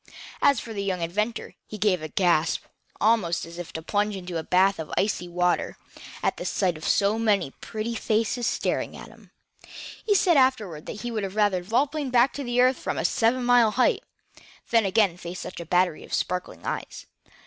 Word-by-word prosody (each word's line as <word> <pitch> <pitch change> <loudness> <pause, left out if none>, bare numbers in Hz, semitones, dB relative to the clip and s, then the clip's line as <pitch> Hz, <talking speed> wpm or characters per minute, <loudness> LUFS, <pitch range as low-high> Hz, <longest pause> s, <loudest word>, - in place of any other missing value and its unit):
As 280 -4 +4
for 225 - -7
the 200 - -3
young 185 -3 -2
inventor, 210 +7 -2
he 215 - -7
gave 195 -4 +1
a 155 - -4
gasp, 165 -1 +1 0.4
almost 200 -7 +2
as 170 +1 -10
if 175 - -5
he - - -15
had 160 0 -6
plunged 205 +1 0
into 180 -2 -4
a - - -5
bath 190 +2 +3
of 160 - -6
icy 195 -3 0
water, 180 0 0 0.5
at - - 0
the - - -5
sight 185 -4 0
of 155 - -6
so 205 +2 +2
many 205 -10 +1
pretty 220 +1 -4
faces 225 +2 0
staring - - -1
at - - -10
him. - - -18 0.7
He 415 -2 +2
said 350 -4 +4
afterward 215 - +1
that 210 - -6
he 240 - -4
would 200 -4 -3
rather 205 -3 +3
have 180 0 -7
vol 240 +6 +3
planed 290 -2 -4
back 250 +2 +4
to 245 -4 -3
earth 255 +1 +4
from - - -3
a - - -1
seven 250 0 +2
mile 245 -2 +5
height, 390 - +2 0.7
than 230 -2 +4
again 190 -3 +2
face 175 0 -7
such - - -7
a 170 - -7
battery 180 -2 +1
of - - -3
sparkling 180 0 -3
eyes. - - -5
205 Hz, 205 wpm, -25 LUFS, 180-235 Hz, 0.7 s, mile